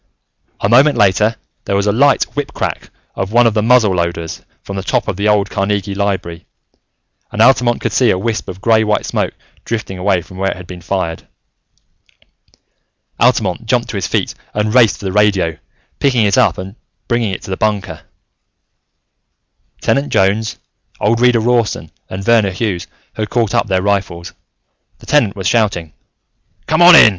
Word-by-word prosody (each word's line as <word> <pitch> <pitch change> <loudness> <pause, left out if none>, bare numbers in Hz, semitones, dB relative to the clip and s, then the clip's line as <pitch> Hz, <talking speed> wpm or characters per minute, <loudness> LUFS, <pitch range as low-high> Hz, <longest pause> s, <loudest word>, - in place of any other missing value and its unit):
A - - +1
moment 135 +4 +5
later, 105 +2 +3 0.3
there 100 - -1
was 100 0 +1
a 105 - +2
light 140 +6 +3
whip 145 -1 -3
crack - - -4 0.2
of 95 +1 -4
one 120 +1 +4
of 115 - +3
the 105 - +1
muzzleloaders, 90 -8 +1 0.2
from 100 - -7
the 95 - -3
top - - -1
of - - -2
the 100 +3 -1
old 105 -1 +2
Carnegie 100 0 -1
Library, 95 -4 -3 0.8
and - - -6
Altamont 120 0 +4
could - - -1
see 125 -3 +3
a 95 - +2
wisp 110 +3 -3
of 95 +1 -8
grey 110 0 +3
white 105 -1 0
smoke - - -2 0.3
drifting 105 -5 -4
away 90 -2 +1
from 95 - -13
where 95 +1 0
it - - -4
had 90 - -10
been 90 0 -10
fired. 90 -2 -3 1.9
Altamont - - +1
jumped - - 0
to - - -5
his - - -2
feet - - -1 0.2
and 105 +1 0
raced 115 -5 +4
for - - -10
the 95 - -1
radio, 100 -5 +2 0.4
picking 125 -6 +2
it 100 - +2
up 115 -9 +3
and 95 +2 -7 0.3
bring 120 0 +1
it 100 -5 -3
to - - -8
the 95 - -2
bunker. 100 -6 -2 1.8
Tenant 140 +1 0
Jones, 100 +3 +1 0.4
old 115 +2 +1
Reader 125 -2 +4
Rawson, 120 -2 0 0.2
and 95 +1 -6
Verner 115 -2 +3
Hughes 95 -2 -3 0.3
had 110 -1 -4
caught 115 -4 0
up - - +1
their 95 -2 0
rifles. 95 -4 -2 0.6
The - - -17
Tenant 120 -9 +2
was 95 -2 -6
shouting. 95 -8 0 0.7
"Come - - +1
on 175 0 +9
in! 110 - +9
105 Hz, 175 wpm, -16 LUFS, 95-115 Hz, 1.9 s, on